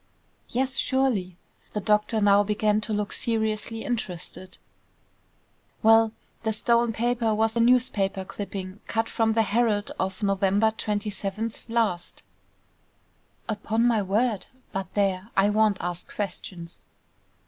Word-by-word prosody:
"Yes; 260 +2 -1
surely." 235 -10 0 0.4
The 210 - -1
doctor 210 +2 +2
now 205 0 +6
began 210 +1 +1
to 220 - -4
look 210 -1 -1
seriously 225 0 -1
interested. 185 -5 -4 1.3
"Well, 225 0 +6 0.3
the 220 -1 -1
stolen 235 +1 +2
paper 230 -1 0
was 220 +1 +1
a - - +1
newspaper 230 -6 +2
clipping, 195 -1 -6
cut 225 0 0
from 225 -1 +1
the 225 0 +3
Herald 215 -1 +1
of 190 +3 -2
November 200 +2 +3
27th 210 0 -3
last." 225 -7 -1 1.2
"Upon 220 +2 0
my 230 -3 +3
word! 210 +2 0 0.2
But 190 -1 -4
there, 195 0 0
I 200 +1 +4
won't 215 -1 +3
ask 175 0 -5
questions." 180 -3 -5
215 Hz, 120 wpm, -26 LUFS, 195-225 Hz, 1.3 s, now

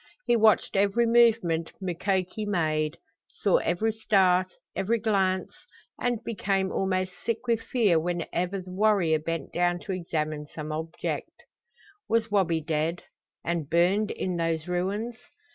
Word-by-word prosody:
He 240 - +3
watched 220 -4 +4
every 205 +4 +3
movement 230 -9 +3
Mukoki 190 +2 -1
made; 155 -5 0 0.4
saw 200 - +4
every 215 +6 0
start, 185 -4 +2 0.2
every 205 +5 +1
glance, 190 -4 0 0.5
and 240 -2 -1
became 195 -3 -1
almost 185 -1 0
sick 230 +1 -2
with 230 -2 +1
fear 210 -11 +2
whenever 175 +3 -2
the 185 0 -11
warrior 190 -5 +3
bent 165 -1 -4
down 175 0 +2
to 200 - -5
examine 155 -4 -3
some 155 0 -7
object. 160 +1 -4 0.8
Was 225 -1 +1
Wabi 175 -5 +2
dead 160 +2 -1 0.4
and 165 -4 -2
burned 185 +6 +3
in 180 -2 -2
those 165 -1 -1
ruins? 200 +6 -2
185 Hz, 130 wpm, -27 LUFS, 165-210 Hz, 0.8 s, watched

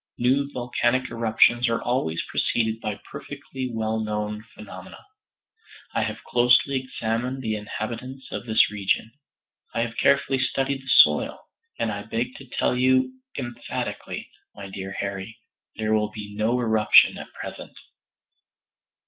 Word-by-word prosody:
New 135 +3 +2
volcanic 125 0 0
eruptions 115 +1 +3
are 115 - +1
always 100 -10 -1
preceded 110 -1 0
by 105 -2 -3
perfectly 130 -1 -6
well 110 -1 -1
known 105 0 -3
phenomena. 95 -3 -11 0.9
I - - +1
have - - -3
closely 125 +3 +4
examined 125 +1 -3
the 110 -2 -1
inhabitants 120 +5 -6
of 120 - -5
this 110 -1 +4
region; 105 +2 0 0.6
I 115 - +1
have 115 0 -3
carefully 140 -1 +3
studied 135 +1 0
the 135 - -10
soil, 75 -11 +6 0.4
and 115 -2 0
I 100 -1 -4
beg 115 +4 -3
to 135 -2 -13
tell - - 0
you 130 0 +2 0.2
emphatically, 120 -3 -5 0.2
my 100 -1 -9
dear 95 0 -6
Harry, 100 +2 -5 0.4
there 110 0 0
will 105 -1 +2
be 105 -1 -8
no 110 +4 +1
eruption 110 -3 +5
at - - -9
present." - - -8
115 Hz, 135 wpm, -25 LUFS, 105-130 Hz, 0.9 s, soil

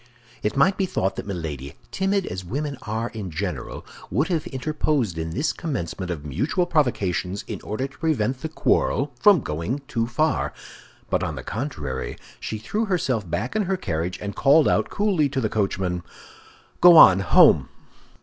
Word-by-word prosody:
It 105 +4 -2
might 190 +8 +4
be 190 - +1
thought 95 - -1
that - - -5
Milady, 75 -6 -5 0.2
timid 195 0 0
as 95 +1 -5
women 140 - -3
are 110 +2 -3
in 105 -5 -6
general, 90 +3 -5 0.2
would 135 - 0
have 165 -4 -1
interposed 140 - -1
in 80 0 -3
this 140 - -1
commencement 95 - -4
of 80 -4 -5
mutual 135 - 0
provocations 100 - 0
in - - -6
order 110 +5 -3
to 140 - -20
prevent 135 -6 0
the 160 - -3
quarrel 145 -2 +1
from 200 -7 +6
going 85 - -3
too 115 -6 -1
far; 155 +7 0 0.6
but - - +2
on - - -2
the - - -7
contrary, 75 - -4 0.2
she 110 - -4
threw 210 - -2
herself 130 - -1
back 115 +9 -3
in 215 -2 +1
her 190 +1 0
carriage, 85 - -3
and 100 -1 -5
called 145 +2 +5
out - - +2
coolly 190 -9 +1
to 135 -1 -2
the 110 -4 0
coachman, 95 -4 -1 0.8
"Go 175 -1 +9
on—home!" 95 - +7
120 Hz, 170 wpm, -24 LUFS, 90-155 Hz, 0.8 s, Go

